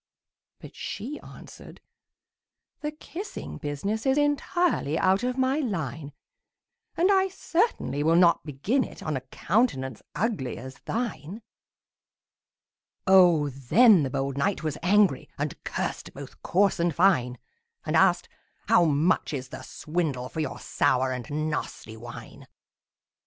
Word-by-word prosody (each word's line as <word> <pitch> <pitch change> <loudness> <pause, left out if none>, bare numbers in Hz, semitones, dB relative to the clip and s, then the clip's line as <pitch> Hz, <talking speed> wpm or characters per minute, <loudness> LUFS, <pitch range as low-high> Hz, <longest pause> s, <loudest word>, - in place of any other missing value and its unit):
But - - -12
she 260 +9 -6
answered, - - -13 1.0
"The 300 - -3
kissing 330 +6 -8
business 195 - -3
Is 265 +1 +3
entirely 290 - +1
out 190 +2 +3
of 250 +1 -2
my 260 +3 +1
line; 160 - -3 0.9
And 360 +4 +4
I 385 -1 +4
certainly 365 - -1
will 160 +2 +3
not 170 -1 +5
begin 165 - 0
it - - -10
On 155 -2 -2
a 130 - -3
countenance 130 - -1
ugly 190 - -2
as 130 +2 -9
thine!" 220 -4 -4 1.6
Oh, 175 -6 +5
then 175 - +5
the 135 - -1
bold 135 +1 -2
knight 200 +3 0
was 155 -2 -2
angry, 195 -6 +3
And - - -4
cursed - - -4
both - - -10
coarse 195 +1 +2
and 170 -3 +1
fine; 145 -10 +3 0.5
And - - -1
asked, - - +4 0.4
"How 175 - +6
much 160 +2 +1
is 130 -1 -6
the - - -8
swindle 150 -6 -3
For - - -6
your 155 -4 -3
sour 130 0 +1
and 125 -3 -5
nasty 150 -6 -4
wine?" 120 +2 -11
170 Hz, 130 wpm, -26 LUFS, 140-230 Hz, 1.6 s, How